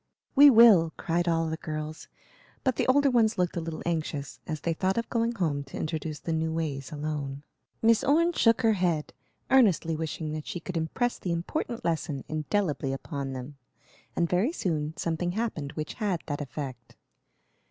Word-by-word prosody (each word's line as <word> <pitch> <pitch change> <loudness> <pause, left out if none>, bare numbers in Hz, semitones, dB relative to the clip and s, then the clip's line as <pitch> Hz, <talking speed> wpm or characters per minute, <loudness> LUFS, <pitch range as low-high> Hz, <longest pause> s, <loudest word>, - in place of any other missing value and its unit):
"We 290 +1 +9
will!" 220 -10 +7
cried 175 0 -1
all 165 -1 +2
the 160 0 -3
girls; 155 0 -6 0.6
but 260 -2 +1
the - - 0
older 275 +1 +4
ones 225 -3 +3
looked 180 -2 0
a 170 - -1
little 160 -1 -5
anxious, 155 -4 -3
as 155 -2 -4
they 170 - 0
thought 190 +4 0
of 230 - -1
going 230 0 +1
home 155 -9 -1
to 135 - -9
introduce 155 -1 -3
the 165 - -3
new 160 0 0
ways 150 -5 -3
alone. 145 -2 -4 0.4
Miss 225 0 +5
Orne 335 +5 +3
shook 230 -4 +3
her 225 -1 +5
head, 175 -6 0 0.4
earnestly 195 -11 +4
wishing 160 0 -4
that 155 -1 -5
she 175 - -4
could 180 +1 -7
impress 170 +10 -1
the 180 - -3
important 205 - -3
lesson 155 -4 -1
indelibly 155 -3 -1
upon 135 0 -4
them; 130 +2 -7 0.6
and 170 - +2
very 185 - +1
soon 160 - -2
something 175 +1 -1
happened 180 -10 -3
which 155 0 -4
had 195 -6 -2
that 145 -1 -3
effect. 130 -3 -7
165 Hz, 175 wpm, -28 LUFS, 150-205 Hz, 0.6 s, We